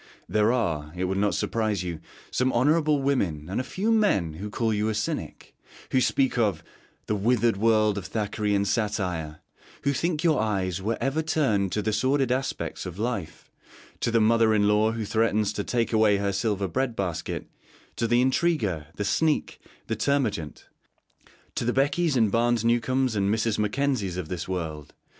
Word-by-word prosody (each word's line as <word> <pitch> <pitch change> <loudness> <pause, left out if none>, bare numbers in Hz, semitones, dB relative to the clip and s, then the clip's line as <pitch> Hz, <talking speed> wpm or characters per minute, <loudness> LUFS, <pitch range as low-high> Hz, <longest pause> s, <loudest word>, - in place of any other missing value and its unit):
There 105 +1 +2
are, 80 -12 -1
it 90 - -2
will 95 +1 0
not 100 -1 +1
surprise 110 -5 -1
you, 85 -3 -4 0.3
some 130 +1 +1
honourable 150 +3 +2
women 90 - 0
and 105 - 0
a - - -5
few 205 - -1
men 200 - +2
who 100 +7 -6
call 110 +1 0
you 105 +1 0
a 110 - -1
cynic; 105 - -4 0.4
who 130 - +3
speak 130 -1 +1
of 100 -8 +1 0.4
'the 105 - -1
withered 115 +1 +2
world 110 -1 +3
of 90 - -8
Thackerayan 105 -2 -1
satire;' 90 -8 -2 0.4
who 140 - +2
think 165 +2 -1
your 160 -8 +3
eyes 95 -4 -1
were 110 +4 -1
ever 135 +6 0
turned 135 - +1
to 105 - -1
the 110 0 0
sordid 130 +3 +1
aspects 130 -6 -2
of 90 0 -8
life 105 -7 -4 0.5
to - - 0
the 115 0 +3
mother 110 0 +4
in 105 -1 +3
law 105 +1 +3
who 115 -2 -3
threatens 110 -1 +1
to 105 - -3
'take 115 +1 -1
away 110 -2 +4
her 100 0 0
silver 100 0 -1
bread 120 +7 -1
basket;' 90 -5 -3 0.5
to 115 - 0
the 120 +1 +3
intriguer, 130 - 0
the 100 - -3
sneak, 150 +10 0 0.3
the 110 - -2
termagant; 110 - -1 0.9
to - - -2
the 120 +1 0
Beckys, 140 +2 +1
and 110 -4 +3
Barnes 120 0 +2
Newcomes, 125 +1 +1
and 100 0 +1
Mrs. 110 0 0
Mackenzies 105 -4 0
of 85 -4 -5
this 90 -3 -4
world. 80 -5 -5
110 Hz, 175 wpm, -26 LUFS, 100-125 Hz, 0.9 s, mother